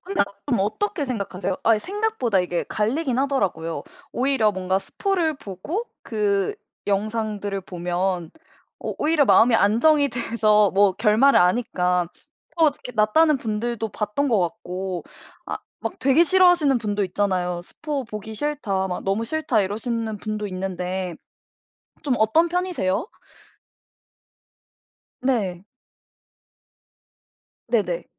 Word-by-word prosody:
근데 385 Hz, +2 st, 0 dB, 0.2 s
그럼 240 Hz, -8 st, +1 dB
어떻게 295 Hz, -, -1 dB
생각하세요? 200 Hz, -6 st, -3 dB
아 225 Hz, -1 st, +4 dB
생각보다 385 Hz, -, 0 dB
이게 175 Hz, -1 st, -2 dB
갈리긴 250 Hz, +5 st, 0 dB
하더라고요. 180 Hz, -, -1 dB, 0.3 s
오히려 250 Hz, -5 st, +2 dB
뭔가 185 Hz, 0 st, 0 dB
스포를 350 Hz, -, -1 dB
보고 270 Hz, -, -5 dB, 0.2 s
그 200 Hz, -3 st, 0 dB, 0.3 s
영상들을 205 Hz, -1 st, -1 dB
보면 180 Hz, -1 st, -2 dB, 0.5 s
어 -, -, -4 dB
오히려 305 Hz, -1 st, +3 dB
마음이 240 Hz, -2 st, +5 dB
안정이 280 Hz, +9 st, +4 dB
돼서 215 Hz, -4 st, +2 dB
뭐 200 Hz, 0 st, +4 dB
결말을 220 Hz, +7 st, +4 dB
아니까 180 Hz, -2 st, +2 dB, 0.5 s
또 325 Hz, -, +6 dB
어떻게 280 Hz, -4 st, -2 dB
낫다는 245 Hz, +8 st, +4 dB
분들도 225 Hz, 0 st, -2 dB
봤던 210 Hz, +7 st, -1 dB
것 225 Hz, -4 st, +3 dB
같고 185 Hz, 0 st, -3 dB, 0.4 s
아 -, -, -4 dB, 0.3 s
막 -, -, -3 dB
되게 275 Hz, +5 st, +4 dB
싫어하시는 350 Hz, -6 st, +4 dB
분도 210 Hz, -2 st, -1 dB
있잖아요. 180 Hz, -2 st, -1 dB
"스포 290 Hz, -, -4 dB
보기 220 Hz, -1 st, -7 dB
싫다. 215 Hz, -8 st, -1 dB
막 180 Hz, -1 st, -4 dB
너무 195 Hz, +4 st, 0 dB
싫다." 255 Hz, -4 st, +1 dB
이러시는 220 Hz, +2 st, -3 dB
분도 215 Hz, 0 st, -3 dB
있는데 185 Hz, -2 st, -4 dB, 0.9 s
좀 270 Hz, -5 st, +1 dB
어떤 265 Hz, +11 st, +3 dB
편이세요? 355 Hz, -, -1 dB, 2.1 s
네. 200 Hz, -9 st, -1 dB, 2.0 s
네네. 195 Hz, -7 st, 0 dB
215 Hz, 260 characters per minute, -23 LUFS, 190-275 Hz, 2.1 s, 또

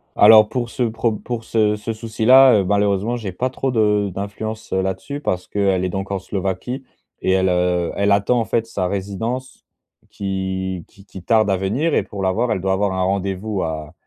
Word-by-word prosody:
Alors 110 Hz, 0 st, +7 dB
pour 120 Hz, -2 st, -3 dB
ce -, -, -5 dB
prob 115 Hz, -1 st, -1 dB
pour 120 Hz, -2 st, -4 dB
ce 105 Hz, -2 st, +1 dB
ce 105 Hz, +2 st, -4 dB
souci-là, 115 Hz, +4 st, +5 dB
heu, -, -, -3 dB
malheureusement, 105 Hz, +3 st, +1 dB
j'ai 105 Hz, -6 st, -5 dB
pas 125 Hz, +8 st, -2 dB
trop 135 Hz, 0 st, -2 dB
de 105 Hz, -3 st, +2 dB
d'influence 110 Hz, +3 st, -6 dB
là-dessus 95 Hz, +9 st, -2 dB
parce 90 Hz, -7 st, -2 dB
qu'elle 95 Hz, -2 st, 0 dB
est -, -, -1 dB
donc 95 Hz, +2 st, -4 dB
en 100 Hz, -, 0 dB
Slovaquie 100 Hz, +7 st, -4 dB, 0.4 s
et -, -, +1 dB
elle, 95 Hz, 0 st, +2 dB
heu, 90 Hz, -1 st, +1 dB
elle 100 Hz, 0 st, +1 dB
attend, 100 Hz, +5 st, +3 dB
en 115 Hz, -, 0 dB
fait, 115 Hz, -1 st, 0 dB
sa 95 Hz, -5 st, -2 dB
résidence 100 Hz, +7 st, -4 dB, 0.4 s
qui 95 Hz, -2 st, -3 dB
qui 100 Hz, 0 st, -19 dB
qui 95 Hz, -, -11 dB
tarde 110 Hz, -1 st, +3 dB
à 95 Hz, -, +2 dB
venir 120 Hz, -, -1 dB
et -, -, +2 dB
pour 100 Hz, -2 st, -6 dB
l'avoir, 110 Hz, +6 st, 0 dB
elle 95 Hz, -, 0 dB
doit 95 Hz, 0 st, 0 dB
avoir 100 Hz, 0 st, 0 dB
un 95 Hz, -, 0 dB
rendez-vous 95 Hz, +1 st, -2 dB
à 80 Hz, -1 st, -4 dB
100 Hz, 195 wpm, -20 LUFS, 95-115 Hz, 0.4 s, Alors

